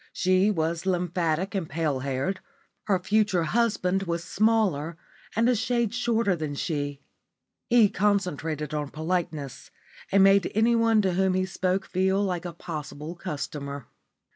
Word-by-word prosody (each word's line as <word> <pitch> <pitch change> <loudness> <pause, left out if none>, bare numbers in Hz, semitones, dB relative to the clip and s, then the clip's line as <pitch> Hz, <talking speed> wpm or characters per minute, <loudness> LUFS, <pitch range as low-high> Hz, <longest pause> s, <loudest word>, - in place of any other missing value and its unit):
She 185 +2 +3
was 165 -1 -1
lymphatic 180 0 0
and 185 -6 -2
pale 150 -3 -1
haired; 135 +8 -2 0.5
her 200 -3 +2
future 200 -1 +1
husband 195 -1 +1
was 170 -2 -2
smaller 190 -8 +1 0.4
and 230 +2 +3
a 250 - +4
shade 235 -1 0
shorter 230 -5 +1
than 155 -3 -4
she. 145 -2 -3 0.7
He 235 -3 +6
concentrated 180 -7 -1
on 150 -2 -2
politeness, 155 -3 -3 0.4
and 195 0 +5
made 195 0 +4
anyone 225 -1 +3
to 190 -2 +1
whom 190 0 +2
he 185 0 +1
spoke 185 0 -1
feel 190 +2 +1
like 180 -3 -2
a 175 - -5
possible 155 -1 -6
customer. 145 -6 -6
180 Hz, 140 wpm, -26 LUFS, 155-200 Hz, 0.7 s, He